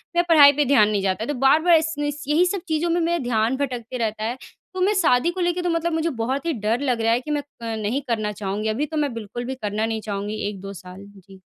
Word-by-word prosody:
मैं 345 - +4
पढ़ाई 290 -4 +8
पे 295 +1 +1
ध्यान 245 -6 +4
नहीं 205 -2 0
जाता। 195 +3 -1
तो 290 - -2
बार-बार 320 +5 +5
इस 320 +1 -1
इस 290 0 -3
यही 315 +5 +3
सब 360 0 -2
चीज़ों 320 +1 0
में 340 +1 +1
मेरा 340 +1 +1
ध्यान 235 +1 0
भटकते 250 -3 -4
रहता 220 -2 -2
है। 240 +3 -2 0.4
तो 370 - -4
मैं 400 +3 +3
शादी 310 +2 +3
को 370 - -7
लेके 350 0 0
तो 350 - -1
मतलब 335 0 0
मुझे 320 +1 0
बहुत 265 +3 -3
ही 330 - 0
डर 225 0 -1
लग 250 -5 0
रहा 225 0 +2
है 240 - +2
कि 300 - -6
मैं 295 - 0 0.2
अ, 230 -1 -3
नहीं 220 +6 -2
करना 215 -3 -1
चाहूँगी, 205 +1 -3
अभी 260 +8 -1
तो 310 +1 -5
मैं 290 -4 0
बिल्कुल 230 +2 -6
भी 265 - -4
करना 215 -2 -2
नहीं 225 -1 -3
चाहूँगी 205 0 -4
1-2 195 0 -8
साल। 185 +1 -11
जी। 195 -1 -16
245 Hz, 260 wpm, -23 LUFS, 215-310 Hz, 0.4 s, पढ़ाई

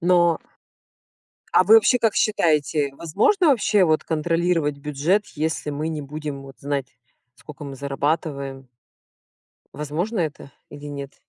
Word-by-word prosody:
но 175 -1 +3 1.1
А - - +6
вы 215 +5 +7
вообще 225 +3 +6
как 225 -2 +1
считаете? 150 -7 +1
Возможно 300 - +2
вообще 210 -7 +3
вот 155 -2 +1
контролировать 165 -1 0
бюджет, 150 +8 0
если 155 0 -2
мы 150 +2 -3
не 155 -2 -4
будем 145 -1 -6
вот 135 -1 -13
знать 140 -1 -4 0.4
сколько 150 -1 -11
мы 140 -1 -7
зарабатываем? 140 -1 -3 1.1
Возможно 170 +9 -3
это 145 -3 -4 0.2
или 145 0 -10
нет? 140 -1 -7
155 Hz, 130 wpm, -23 LUFS, 140-175 Hz, 1.1 s, вы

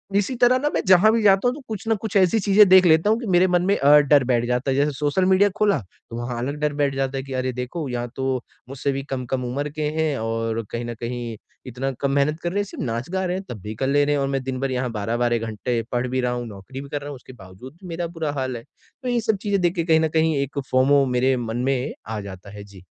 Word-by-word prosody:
इसी 205 +6 +1
तरह 245 +1 +4
ना 295 +2 0
मैं - - +1
जहाँ 190 +4 +6
भी 230 0 +1
जाता 195 +3 +4
हूँ, 250 - 0
तो 295 - -10
कुछ 220 0 -6
न 225 - +3
कुछ 220 -1 -5
ऐसी 190 +4 +4
चीज़ें 200 +1 +5
देख 185 -1 +7
लेता 160 +5 +4
हूँ 225 +2 +2
कि 240 - -6
मेरे 185 0 +4
मन 175 -1 +2
में 200 - +3
अ, 145 +2 +6
डर 145 -1 +4
बैठ 120 -1 +1
जाता 125 +2 0
है। - - 0
जैसे 145 +1 +2
सोशल 150 +7 0
मीडिया 190 +2 +4
खोला 205 -2 +2 0.3
तो 115 - -7
वहाँ 120 0 -4
अलग 140 +4 -3
डर 150 -1 0
बैठ 140 -2 0
जाता 135 0 -1
है 135 - -3
कि 135 -1 -8
अरे 130 0 -1
देखो 125 +5 -4
यहाँ 120 0 -3
तो 130 -2 -1 0.3
मुझसे 140 +1 -2
भी 135 0 -3
कम-कम 130 -1 -3
उम्र 140 +4 -3
के 155 - -4 0.2
हैं 155 -3 0
और 115 0 -2
कहीं 120 0 -4
न 120 - -4
कहीं 120 -1 -4 0.3
इतना 130 +2 -3
कम 140 -1 +1
मेहनत 145 +3 +1
कर 175 - 0
रहे 200 - -1
हैं - - +1
सिर्फ़ 200 - -7
नाच-गा 130 +11 -3
रहे 180 0 -1
हैं 195 - -6
तब 110 - -6
भी 105 +2 -6
कर 135 +4 -2
ले 145 +1 +3
रहें 145 0 +1
है 140 - 0
और 135 - 0
मैं 135 -1 -2
दिनभर 130 0 -3
यहाँ 125 -1 -2
12-12 120 +3 0
घंटे 115 +2 -2
पढ़ 125 +1 -1
भी 130 +1 -1
रहा 125 0 0
हूँ, 120 0 -3
नौकरी 110 +6 -9
भी 140 - -10
कर 145 - -3
रहा 145 - -7
हूँ, 140 - -6
उसके 130 0 -13
बावजूद 95 +6 -13
भी 185 - -10
मेरा 170 0 -3
बुरा 165 -3 -3
हाल 130 -3 -3
है, 115 - -10
तो 255 - -14
ये 240 -1 +1
सब 220 -2 0
चीज़ें 200 -2 0
देख 175 +1 +1
के 170 - 0
कहीं 160 -1 +3
न 160 - +2
कहीं 160 -1 +2
एक 140 +1 -2
फ़ोमो 135 +2 +4
मेरे 130 +1 +1
मन 115 -1 -4
में 135 +1 -1
आ 110 -1 -4
जाता 100 0 -10
है। 100 - -8
जी। 100 -3 -15
135 Hz, 280 wpm, -23 LUFS, 125-175 Hz, 0.3 s, देख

